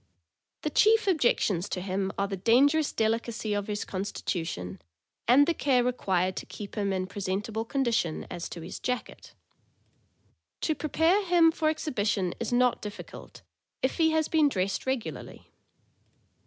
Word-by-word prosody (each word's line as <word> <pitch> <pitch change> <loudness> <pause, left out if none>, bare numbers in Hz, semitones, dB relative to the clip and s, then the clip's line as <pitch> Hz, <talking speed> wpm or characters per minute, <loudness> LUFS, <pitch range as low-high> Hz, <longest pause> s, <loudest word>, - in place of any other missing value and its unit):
The 305 - -1
chief 440 +7 +4
objections 235 - +2
to 185 - -2
him 190 +1 -2
are 200 - 0
the 195 - -3
dangerous 280 - +3
delicacy 225 -1 -1
of 205 -1 -2
his 210 -1 -3
constitution 165 - -4 0.5
and 270 +4 +7
the 340 - +1
care 260 -6 +2
required 185 -7 0
to - - -5
keep 205 -2 -8
him 200 -2 -1
in 185 -1 -1
pre 200 +2 -7
sentable 210 +4 -3
condition 235 - 0
as 175 -1 -5
to 170 - -7
his 170 - -7
jacket. 250 -1 -5 1.3
To 315 - +1
prepare 320 +6 +2
him 345 -2 +5
for 315 -1 0
exhibition 205 - -1
is 235 - -3
not 245 0 +2
difficult, 210 -1 -9 0.4
if 260 - 0
he 320 -1 +5
has 315 -1 +1
been 310 -3 +3
dressed 195 0 -2
regularly. 260 -3 -4
225 Hz, 150 wpm, -28 LUFS, 195-285 Hz, 1.3 s, and